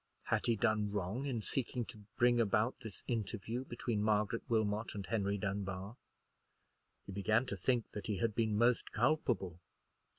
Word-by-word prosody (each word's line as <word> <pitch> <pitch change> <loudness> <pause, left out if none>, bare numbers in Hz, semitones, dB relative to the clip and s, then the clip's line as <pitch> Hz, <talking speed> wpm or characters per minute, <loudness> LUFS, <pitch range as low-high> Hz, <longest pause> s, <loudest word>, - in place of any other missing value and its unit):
Had - - 0
he 115 - +4
done 110 -2 +2
wrong 105 +7 -2
in 120 -5 -2
seeking 125 -1 -1
to 110 - -10 0.2
bring 120 0 +5
about 110 +3 +2
this 110 -6 -8
interview 115 +1 -2
between 120 -4 -2
Margaret 105 +1 +2
Wilmot 110 -1 +1
and 100 -2 -4
Henry 100 -2 0
Dunbar? 100 +1 -3 1.1
He - - -7
began 105 +5 +2
to 100 - -3
think 120 +4 0
that 105 - -5
he 105 -2 0
had 110 +3 +1
been 110 -1 +1
most 120 +2 +3
culpable. 120 - +1
110 Hz, 160 wpm, -36 LUFS, 100-120 Hz, 1.1 s, bring